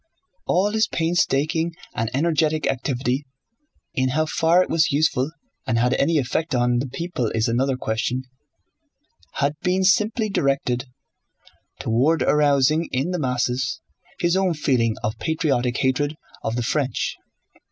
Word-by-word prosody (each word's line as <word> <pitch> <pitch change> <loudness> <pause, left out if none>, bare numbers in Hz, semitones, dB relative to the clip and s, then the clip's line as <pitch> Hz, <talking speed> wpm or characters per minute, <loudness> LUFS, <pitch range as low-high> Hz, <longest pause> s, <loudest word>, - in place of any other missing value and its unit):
All 195 +4 +2
his 220 0 +2
painstaking 165 -1 0 0.2
and 115 0 -1
energetic 155 +1 +1
activity 130 +1 -1 0.7
(in 130 0 +1
how 155 +4 +1
far 165 +3 +3
it - - -6
was 160 -2 +3
useful 145 -2 +1 0.4
and 115 - +1
had 125 +2 +2
any 160 +3 +2
effect 145 +3 -1
on 120 0 +2
the 135 - -2
people 135 -2 -3
is 110 +1 +1
another 130 +3 +1
question) 120 +2 -2 1.1
had 140 +1 0
been 185 +1 +1
simply 210 +4 +2
directed 135 -8 0 0.9
toward 135 +8 +2
arousing 150 +2 +3
in 135 +8 -1
the 180 - -2
masses 125 0 -1 0.4
his 175 +1 +2
own 190 -3 +1
feeling 120 -7 +1
of 110 +2 -2
patriotic 135 -6 0
hatred 145 +3 0 0.3
of 110 - -2
the 120 - -1
French. 135 +2 -1
140 Hz, 135 wpm, -23 LUFS, 125-165 Hz, 1.1 s, far